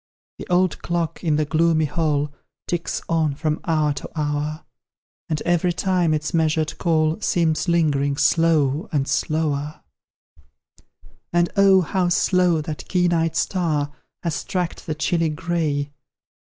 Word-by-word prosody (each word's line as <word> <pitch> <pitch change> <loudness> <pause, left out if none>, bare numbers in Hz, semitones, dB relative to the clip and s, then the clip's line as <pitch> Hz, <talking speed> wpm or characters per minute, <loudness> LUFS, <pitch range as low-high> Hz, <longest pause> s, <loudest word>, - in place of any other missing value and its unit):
The - - -7
old 180 0 +1
clock 170 -1 -2
in 155 -3 +2
the 155 0 +1
gloomy 160 +1 +2
hall 150 -1 -1 0.3
Ticks 170 -1 -2
on, 160 -4 +1
from 155 +1 -1
hour 155 -4 +1
to 140 - -7
hour; 150 +1 -2 0.6
And 155 -2 -2
every 175 +1 +2
time 180 -2 +1
its 150 -1 -1
measured 160 -1 0
call 160 +1 +1
Seems 165 -2 +1
lingering 145 -5 +1
slow 155 -1 +2
and 140 -2 0
slower: 150 0 -1 1.5
And, 175 0 +2
oh, 195 -1 +6
how 180 +1 0
slow 175 -2 +2
that 150 -1 -6
keen 180 -1 +2
eyed 165 -1 0
star 155 -6 0 0.3
Has 165 -3 -2
tracked 180 -1 -3
the 155 - -2
chilly 165 +1 0
gray! 150 -2 -2
160 Hz, 135 wpm, -22 LUFS, 150-175 Hz, 1.5 s, oh